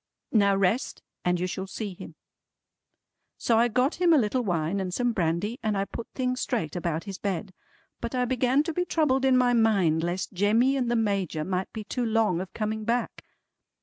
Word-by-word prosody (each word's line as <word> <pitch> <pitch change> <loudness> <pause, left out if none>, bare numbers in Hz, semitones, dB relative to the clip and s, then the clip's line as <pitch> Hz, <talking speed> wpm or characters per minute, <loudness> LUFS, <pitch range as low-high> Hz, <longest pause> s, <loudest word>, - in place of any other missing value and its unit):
"Now 200 -3 +4
rest, 195 +6 0 0.2
and 180 0 +1
you 180 - 0
shall 190 +1 -4
see 200 0 -5
him." - - -11 1.2
So 230 -2 +2
I 235 - +4
got 255 +9 0
him 345 -2 +5
a - - +6
little 250 0 +1
wine 175 -3 -1
and 185 -1 -3
some 245 +6 0
brandy, 185 - -1
and 215 -2 0
I 195 - 0
put 230 - -7
things 255 -1 -1
straight 220 - -2
about 170 -2 -2
his 195 -2 -7
bed. 195 -1 -3 0.5
But 235 +2 -4
I 250 0 +1
began 255 +3 +2
to 330 0 -3
be 360 - 0
troubled 280 -6 +1
in 260 -1 +5
my 250 -1 +3
mind 200 -9 +3
lest 175 +3 -2
Jemmy 220 +8 +3
and 250 -3 0
the 240 - +1
Major 195 -8 0
might 185 +2 -2
be 220 - -6
too 245 +4 -3
long 220 -6 +1
of 190 - -7
coming 220 0 -2
back. 235 +2 -2
215 Hz, 200 wpm, -27 LUFS, 185-245 Hz, 1.2 s, a